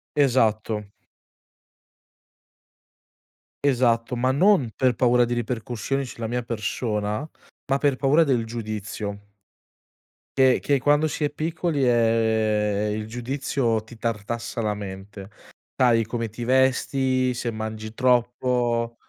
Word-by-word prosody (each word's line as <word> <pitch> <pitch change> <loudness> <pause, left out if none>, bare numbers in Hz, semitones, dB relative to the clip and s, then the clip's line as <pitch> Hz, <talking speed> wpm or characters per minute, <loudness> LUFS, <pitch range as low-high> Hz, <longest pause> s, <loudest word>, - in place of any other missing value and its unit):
Esatto. 115 -6 +2 2.8
Esatto, 125 -3 +2
ma 130 +2 +1
non 170 - +3
per 130 -2 +2
paura 125 0 +4
di 120 - -2
ripercussioni 120 +3 -2
sulla 115 -2 -6
mia 120 +2 -2
persona, 105 +1 -2 0.4
ma 135 - +2
per 140 -2 +2
paura 145 +5 +4
del 125 -6 +1
giudizio 105 -2 -6 1.1
che 130 -1 +5
che 140 -1 +1
quando 145 +2 +3
si 150 - -3
è 145 - +2
piccoli, 160 -4 -1
ehm, 110 -3 +2
il 105 0 -4
giudizio 120 -1 -1
ti 115 +1 -13
tartassa 115 +1 -3
la 105 -2 0
mente, 100 0 -8 0.4
sai, 120 -3 +3
come 115 +1 -3
ti 110 +2 -7
vesti, 130 0 +2
se 120 -1 -3
mangi 110 0 -6
troppo 120 -1 +1
120 Hz, 115 wpm, -24 LUFS, 110-130 Hz, 2.8 s, che